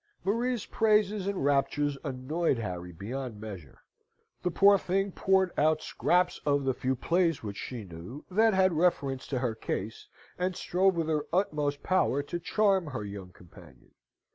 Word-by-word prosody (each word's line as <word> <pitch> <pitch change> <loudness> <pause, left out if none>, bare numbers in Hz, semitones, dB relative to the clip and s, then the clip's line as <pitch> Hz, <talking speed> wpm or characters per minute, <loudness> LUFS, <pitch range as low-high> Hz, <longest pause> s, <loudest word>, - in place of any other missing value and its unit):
Maria's 235 +3 0
praises 210 -2 +2
and 200 -8 -1
raptures 145 +1 +1
annoyed 140 +2 -1
Harry 90 -5 -5
beyond 115 +5 -6
measure. 95 -10 -10 0.6
The 180 - 0
poor 200 +3 +5
thing 195 +2 0
poured 190 0 +2
out 155 +1 +3
scraps 180 0 +1
of 145 -1 +1
the 135 -1 +1
few 130 +1 -1
plays 165 +2 +1
which 105 -2 -5
she 120 -4 -6
knew 90 - -10
that 220 +2 +4
had 190 -1 +4
reference 145 -6 0
to 135 - -2
her 125 -2 -1
case, 110 0 -5 0.3
and 180 0 0
strove 190 +2 +2
with 165 -2 -1
her 150 -2 -1
utmost 150 -6 0
power 165 -7 +2
to 170 +4 -4
charm 195 -1 +2
her 130 -7 -4
young 100 -2 -7
companion. 90 -1 -17
150 Hz, 160 wpm, -29 LUFS, 125-185 Hz, 0.6 s, poor